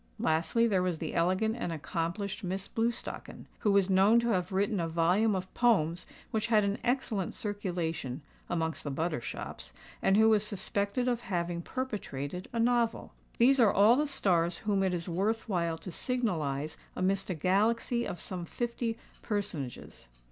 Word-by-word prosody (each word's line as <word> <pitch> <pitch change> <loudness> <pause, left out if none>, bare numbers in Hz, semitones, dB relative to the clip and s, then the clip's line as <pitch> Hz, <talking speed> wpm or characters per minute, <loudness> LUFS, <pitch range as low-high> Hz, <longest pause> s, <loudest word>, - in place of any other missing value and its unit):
Lastly, 160 +9 +2
there 195 -5 +2
was 180 -2 0
the 160 -1 -4
elegant 185 +6 +1
and 235 -8 -3
accomplished 170 +6 -3
Miss 190 +1 -3
Blewstocken, 230 0 -3
who 210 - +2
was 200 -2 +4
known 195 +4 +5
to 235 - 0
have 185 -5 0
written 200 +2 +1
a 165 - 0
volume 180 +6 +2
of 185 0 -5
poems 180 -8 +2 0.2
which 220 0 0
had 215 -2 +4
an 200 +1 -1
excellent 235 -7 -1
circulation 170 - -3 0.3
(amongst 160 -1 -1
the 145 - -3
butter 155 -1 -1
shops), - - -6 0.3
and 195 - +4
who 220 +1 +6
was 215 -2 +4
suspected 205 +3 -1
of 240 -1 0
having 175 -4 -2
perpetrated 180 - -4
a 235 - -2
novel. 235 -1 +1 0.2
These 265 +3 +5
are 225 -4 +6
all 210 +4 +6
the 300 +3 +1
stars 175 -10 +1
whom 200 -2 +2
it 190 -2 +1
is 170 -1 -4
worth 200 +6 -1
while 170 -5 0
to 185 - -8
signalise 160 - -2 0.2
amidst 195 +1 0
a 185 - -1
galaxy 220 - +1
of 175 - -5
some 180 -1 -5
fifty 235 +3 -3 0.2
personages. 175 - -4
195 Hz, 165 wpm, -30 LUFS, 170-225 Hz, 0.3 s, who